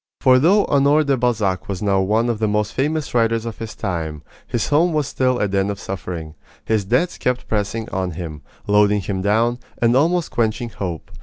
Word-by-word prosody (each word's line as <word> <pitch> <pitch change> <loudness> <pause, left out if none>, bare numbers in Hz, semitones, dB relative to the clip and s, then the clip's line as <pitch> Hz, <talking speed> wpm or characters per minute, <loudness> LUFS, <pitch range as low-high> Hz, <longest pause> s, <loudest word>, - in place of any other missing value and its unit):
For 130 -1 +5
though 190 +9 +4
Honore 145 +2 +3
de 140 -2 +2
Balzac 110 -8 0
was 95 0 -3
now 100 -2 +2
one 110 +5 +1
of 115 -3 -1
the 110 - +1
most 105 0 0
famous 150 +2 -1
writers 115 -1 +1
of 115 -2 -6
his 115 -1 -6
time, 80 -6 -4 0.2
his 120 - -2
home 165 +4 +3
was 150 -2 +1
still 130 -1 0
a 105 - +1
den 95 0 0
of 100 -1 -4
suffering. 85 -4 -6 0.3
His 110 -3 0
debts 125 - 0
kept 125 0 -1
pressing 110 +1 -2
on 95 -1 -2
him, 80 -3 -7 0.2
loading 105 0 +3
him 95 0 -3
down, 115 +5 +1 0.2
and 120 0 +2
almost 165 +5 +2
quenching 115 +1 -1
hope. 90 -7 -6
110 Hz, 200 wpm, -20 LUFS, 100-130 Hz, 0.3 s, For